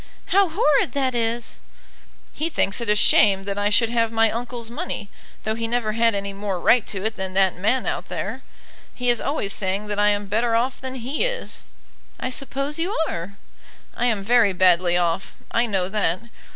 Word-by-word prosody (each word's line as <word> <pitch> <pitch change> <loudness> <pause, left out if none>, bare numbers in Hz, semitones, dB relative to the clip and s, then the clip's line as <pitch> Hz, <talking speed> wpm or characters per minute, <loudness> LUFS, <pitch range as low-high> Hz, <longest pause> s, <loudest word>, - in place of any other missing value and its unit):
"How 390 -1 +4
horrid 300 - +2
that 265 -2 0
is!" 230 0 -2 0.8
"He 320 +2 -2
thinks 220 -8 0
it 235 - -3
a 210 - +4
shame 200 -1 +5
that 200 0 -3
I 205 0 +2
should 225 +2 +3
have 230 -1 +1
my 225 -1 +3
uncle's 235 0 -5
money, 240 - -5 0.3
though 215 - -1
he 230 +1 -3
never 230 -2 0
had 230 0 +2
any 200 0 -3
more 195 -2 -3
right 235 +4 +4
to 195 0 -5
it 220 0 -2
than 190 0 -4
that 190 -1 +3
man 245 +7 +1
out - - -3
there. - - -4 0.5
He 245 0 0
is 240 - +2
always 275 -9 -2
saying 195 +1 -1
that 205 0 -2
I 205 - +4
am 205 0 0
better 230 +3 +1
off 250 +3 0
than 260 0 -5
he 260 - -2
is." - - -2 0.6
"I 255 - -3
suppose 275 +3 -4
you 360 +5 -1
are." 175 +4 -5 0.6
"I 245 - +1
am 215 -5 0
very 225 -2 +4
badly 180 -1 +4
off, 175 +2 -1 0.2
I 235 +1 +2
know 190 -4 0
that. 195 -4 0
225 Hz, 195 wpm, -23 LUFS, 200-245 Hz, 0.8 s, shame